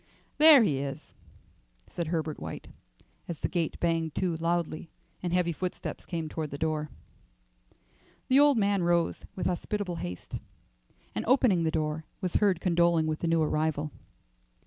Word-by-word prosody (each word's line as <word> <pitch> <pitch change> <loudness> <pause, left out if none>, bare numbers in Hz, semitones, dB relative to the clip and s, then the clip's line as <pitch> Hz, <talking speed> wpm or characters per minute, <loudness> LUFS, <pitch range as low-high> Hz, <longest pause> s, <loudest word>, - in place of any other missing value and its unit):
"There 300 -5 +9
he 145 -10 +1
is," 135 0 -6 0.7
said 170 -2 -4
Herbert 160 -2 -2
White, - - -7 0.6
as 170 - -6
the - - +1
gate 170 -3 -2
banged 165 -2 0
to 180 -3 0
loudly 165 -1 -1 0.3
and 175 - -2
heavy 180 -1 +2
footsteps 180 +3 -5
came 165 -3 -3
toward 155 0 -4
the 140 - -6
door. 155 -1 -1 1.4
The 260 +2 +5
old 290 -3 +6
man 200 -2 +2
rose 170 -1 +1
with 185 - -3
hospitable 180 0 -2
haste, 90 - -6 0.7
and - - -2
opening 245 -8 +4
the - - +2
door, 155 0 -2
was 185 -3 0
heard 195 -5 +2
condoling 170 -2 +3
with 155 0 -2
the 170 - -2
new 165 -1 +3
arrival. 155 -1 0
170 Hz, 150 wpm, -29 LUFS, 155-180 Hz, 1.4 s, There